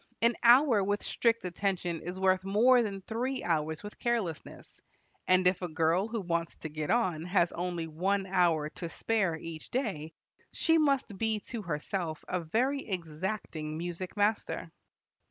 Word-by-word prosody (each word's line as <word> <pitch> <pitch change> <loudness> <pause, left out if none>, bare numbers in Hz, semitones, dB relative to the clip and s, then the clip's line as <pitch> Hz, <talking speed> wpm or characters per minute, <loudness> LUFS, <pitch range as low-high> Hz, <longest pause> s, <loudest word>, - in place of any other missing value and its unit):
An 235 +1 +5
hour 240 -3 +6
with 205 +1 -1
strict 230 -3 +1
attention 180 -2 -2
is 180 +2 -6
worth 185 0 +3
more 235 +6 +5
than 200 -4 -3
three 250 +6 -2
hours 160 -2 -1
with 205 - -9
carelessness; 225 -10 -3 0.5
and 185 0 +4
if 180 0 +2
a 180 - -2
girl 165 +4 +1
who 225 -1 -3
wants 170 -2 -2
to 155 - -7
get 155 0 -4
on 185 -10 +1
has 180 -1 +2
only 175 -1 -3
one 190 +5 0
hour 175 -5 +2
to 170 -1 -6
spare 195 -4 0
each 160 -1 -8
day, 190 - -3 0.4
she 325 0 +3
must 275 -8 +1
be 220 -1 +1
to 235 +1 -6
herself 165 -1 -3
a 180 - -1
very 240 - 0
exacting 165 - -4
music 175 +3 -5
master. 210 +2 0
185 Hz, 155 wpm, -30 LUFS, 165-220 Hz, 0.5 s, hour